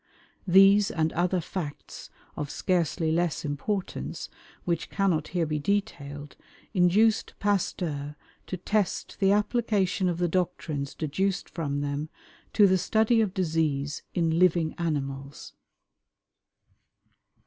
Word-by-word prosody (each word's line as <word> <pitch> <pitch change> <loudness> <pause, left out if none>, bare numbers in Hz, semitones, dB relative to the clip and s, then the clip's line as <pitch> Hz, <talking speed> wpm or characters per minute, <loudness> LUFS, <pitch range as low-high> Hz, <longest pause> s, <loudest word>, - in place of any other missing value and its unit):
These 195 +2 +6
and 160 -2 0
other 180 +2 +1
facts 160 -3 -6 0.3
of 145 - -4
scarcely 170 -2 0
less 170 -2 0
importance, 185 +7 -3 0.4
which 170 -2 -1
cannot 185 -6 +1
here 175 -2 0
be 150 -1 -2
detailed, 145 -6 -3 0.4
induced 210 +4 +3
Pasteur 165 -7 -1 0.3
to 185 - -4
test 205 +1 -1
the 195 -1 +4
application 205 -3 +1
of 170 - -2
the 175 0 +1
doctrines 160 -5 -2
deduced 190 +6 -2
from 145 -4 -2
them 145 +2 -3 0.4
to 210 - +6
the 190 -1 +4
study 220 +4 +3
of 200 -4 -1
disease 155 -5 0
in 165 -1 +1
living 170 -3 +3
animals. 140 -4 -4
175 Hz, 115 wpm, -27 LUFS, 150-195 Hz, 0.4 s, These